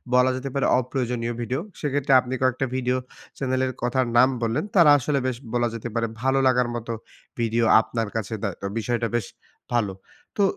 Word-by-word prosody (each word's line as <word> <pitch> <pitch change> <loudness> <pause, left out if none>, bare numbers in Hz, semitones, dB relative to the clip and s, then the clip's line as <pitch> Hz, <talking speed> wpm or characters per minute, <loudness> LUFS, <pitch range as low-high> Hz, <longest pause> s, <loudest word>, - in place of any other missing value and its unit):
বলা 125 +1 +5
যেতে 130 +2 -4
পারে 140 - +1
অপ্রয়োজনীয় 125 -2 -2
ভিডিও। 125 +3 -2 0.2
সেক্ষেত্রে 145 -2 0
আপনি 125 0 -4
কয়েকটা 130 0 +1
ভিডিও 130 0 0 0.4
চ্যানেলের 130 -1 0
কথার 125 +1 +1
নাম 125 +2 +7
বললেন। 115 +6 0
তারা 170 -5 +7
আসলে 140 +2 0
বেশ 130 -2 -2 0.2
বলা 120 0 +2
যেতে 115 +1 -5
পারে 115 0 +1
ভালো 135 +1 +2
লাগার 125 -1 +3
মতো 115 0 -4 0.5
ভিডিও 115 0 +1 0.2
আপনার 115 0 -3
কাছে 110 -1 -3
দেয়, 100 -5 -2
তো - - -4
বিষয়টা 115 +1 -1
বেশ 120 -4 0 0.5
ভালো। 105 -5 +1 0.4
তো 205 - +3
125 Hz, 175 wpm, -24 LUFS, 115-130 Hz, 0.5 s, নাম